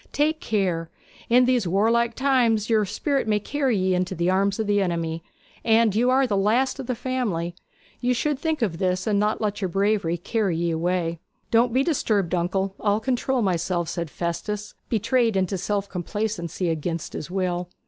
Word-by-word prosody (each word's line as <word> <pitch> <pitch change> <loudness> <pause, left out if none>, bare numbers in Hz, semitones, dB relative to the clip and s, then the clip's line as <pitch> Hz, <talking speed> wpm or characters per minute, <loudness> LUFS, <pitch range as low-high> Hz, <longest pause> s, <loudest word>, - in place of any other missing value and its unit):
'Take 310 +2 +1
care! 185 - -1 0.4
In 250 +2 +6
these 245 -6 +2
warlike 230 +5 +2
times 240 -5 +2
your 215 -2 +3
spirit 275 +6 -1
may 210 -1 +2
carry 265 +1 0
ye 185 0 +1
into 180 0 -1
the 170 +2 +1
arms 195 +1 +1
of 220 - 0
the 205 0 +2
enemy; 165 -3 -2 0.4
and 225 -2 +4
you 240 +4 +2
are 265 +1 +4
the 215 -5 0
last 230 +8 +2
of 265 - -5
the 250 - -1
family. 220 -10 -2 0.5
You 250 0 +1
should 290 +2 0
think 315 -4 -1
of 170 -6 -1
this, 185 0 0
and 205 -2 +2
not 210 +2 0
let 205 -1 -1
your 190 - 0
bravery 195 -2 +1
carry 195 -1 -1
ye 170 0 0
away.' 170 0 -1 0.3
'Don't 235 +1 +4
be 260 +3 +2
disturbed, 215 - 0
uncle; 190 +2 0
I'll 205 0 +1
control 250 +1 0
myself,' 175 -2 0
said 170 -3 -3
Festus, 200 +6 -4 0.2
betrayed 230 0 +2
into 190 +1 0
self 200 +2 -2
complacency 180 -2 -3
against 165 +1 -3
his 155 - -6
will. 180 -1 -2
205 Hz, 180 wpm, -24 LUFS, 180-235 Hz, 0.5 s, In